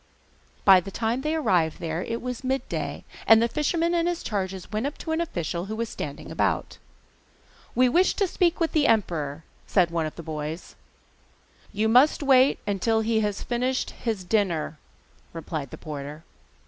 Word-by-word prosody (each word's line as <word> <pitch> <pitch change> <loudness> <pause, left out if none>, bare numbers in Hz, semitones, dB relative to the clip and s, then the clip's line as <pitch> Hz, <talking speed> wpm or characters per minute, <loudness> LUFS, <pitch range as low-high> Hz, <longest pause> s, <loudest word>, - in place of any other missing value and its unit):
By 190 -2 +9
the 180 - -7
time 230 +5 -1
they 305 +3 -1
arrived 180 - +1
there 165 -1 -3
it 230 +1 -4
was 250 0 -4
midday, 265 +1 -3 0.2
and 225 0 +8
the 230 - +3
fisherman 330 +6 0
and 340 0 +2
his 350 -1 -2
charges 190 -3 -3
went 220 +5 -1
up 290 - -6
to 320 - -5
an 320 +1 +1
official 175 - -3
who 215 +2 -5
was 230 0 -3
standing 145 -1 -6
about. - - -1 1.0
'We 255 0 +5
wish 355 +8 +3
to 400 - +2
speak 355 -1 +1
with 330 -1 +1
the 295 -2 +3
emperor,' 160 -9 0 0.2
said 180 -4 +3
one 165 -2 0
of 155 - -9
the 170 - -8
boys. 155 +1 -5 1.0
'You 215 +2 0
must 255 +7 +5
wait 265 -1 +5
until 220 +3 +1
he 220 0 +1
has 210 -2 -1
finished 255 +2 -1
his 220 -5 -3
dinner,' 175 -6 0 0.5
replied 155 -4 -5
the - - -9
porter. 150 +1 -7
220 Hz, 175 wpm, -25 LUFS, 170-265 Hz, 1.0 s, By